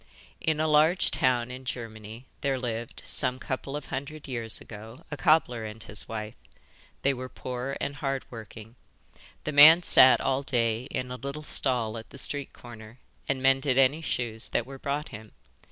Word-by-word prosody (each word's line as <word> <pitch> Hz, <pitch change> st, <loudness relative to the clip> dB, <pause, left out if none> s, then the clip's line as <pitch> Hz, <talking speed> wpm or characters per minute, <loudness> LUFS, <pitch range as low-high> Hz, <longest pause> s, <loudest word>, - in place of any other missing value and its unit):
In 155 Hz, -1 st, 0 dB
a 155 Hz, -, +1 dB
large 155 Hz, +4 st, +3 dB
town 125 Hz, -1 st, +1 dB
in 130 Hz, +1 st, -8 dB
Germany 115 Hz, -2 st, -7 dB, 0.2 s
there 135 Hz, -1 st, 0 dB
lived, 120 Hz, -2 st, -5 dB
some 125 Hz, -, +3 dB
couple 130 Hz, +2 st, -5 dB
of 150 Hz, -, -5 dB
hundred 140 Hz, +3 st, -6 dB
years 115 Hz, -4 st, -3 dB
ago, 110 Hz, +7 st, -11 dB
a -, -, -2 dB
cobbler 155 Hz, -8 st, +2 dB
and 110 Hz, 0 st, -8 dB
his 105 Hz, -, -5 dB
wife. 110 Hz, -1 st, -5 dB, 0.7 s
They 140 Hz, -, +3 dB
were 130 Hz, 0 st, -7 dB
poor 125 Hz, +2 st, -5 dB
and 145 Hz, -, -4 dB
hard 135 Hz, -2 st, -2 dB
working. 110 Hz, -1 st, -10 dB, 0.7 s
The -, -, -3 dB
man 155 Hz, +4 st, +9 dB
sat 130 Hz, -5 st, +7 dB
all 135 Hz, 0 st, 0 dB
day 120 Hz, -3 st, 0 dB
in 125 Hz, -3 st, -4 dB
a 125 Hz, -, -5 dB
little 140 Hz, +4 st, -6 dB
stall 120 Hz, -7 st, +1 dB
at 110 Hz, -, -13 dB
the -, -, -12 dB
street 140 Hz, 0 st, -2 dB
corner 115 Hz, -1 st, -12 dB, 0.3 s
and 135 Hz, -1 st, -1 dB
mended 135 Hz, 0 st, +3 dB
any 135 Hz, +4 st, +4 dB
shoes 115 Hz, -7 st, -2 dB
that -, -, -1 dB
were 135 Hz, 0 st, -10 dB
brought 145 Hz, +2 st, -3 dB
him. 110 Hz, 0 st, -11 dB
130 Hz, 175 wpm, -27 LUFS, 115-140 Hz, 0.7 s, man